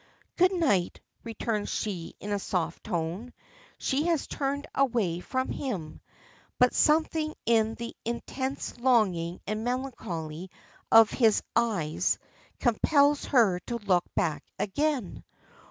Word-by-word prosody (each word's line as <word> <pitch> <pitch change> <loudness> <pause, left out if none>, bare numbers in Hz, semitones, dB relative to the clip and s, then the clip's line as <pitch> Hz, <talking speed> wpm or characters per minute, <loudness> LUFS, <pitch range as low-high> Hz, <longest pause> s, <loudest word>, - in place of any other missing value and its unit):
"Good 365 +1 +4
night," 270 - +1 0.2
returns 225 -2 -3
she 185 -6 -4
in 205 - -6
a 205 - 0
soft 170 -4 -3
tone. 175 +8 -3 0.4
She 290 +5 0
has 330 -4 +1
turned 280 0 -2
away 230 -11 +1
from 260 +8 -2
him, 190 - -4 0.6
but 250 0 +4
something 310 0 +2
in 225 -1 +3
the 235 0 -7
intense 260 +3 -4
longing 190 -9 +2
and 215 +1 -3
melancholy 190 - -4 0.4
of 225 -1 +8
his 225 -4 +3
eyes 205 -10 +1 0.4
compels 285 +4 +3
her 220 -10 +3
to 240 - -2
look 190 -5 +1
back 155 -3 0
again. 280 +1 -1
230 Hz, 120 wpm, -28 LUFS, 185-265 Hz, 0.6 s, of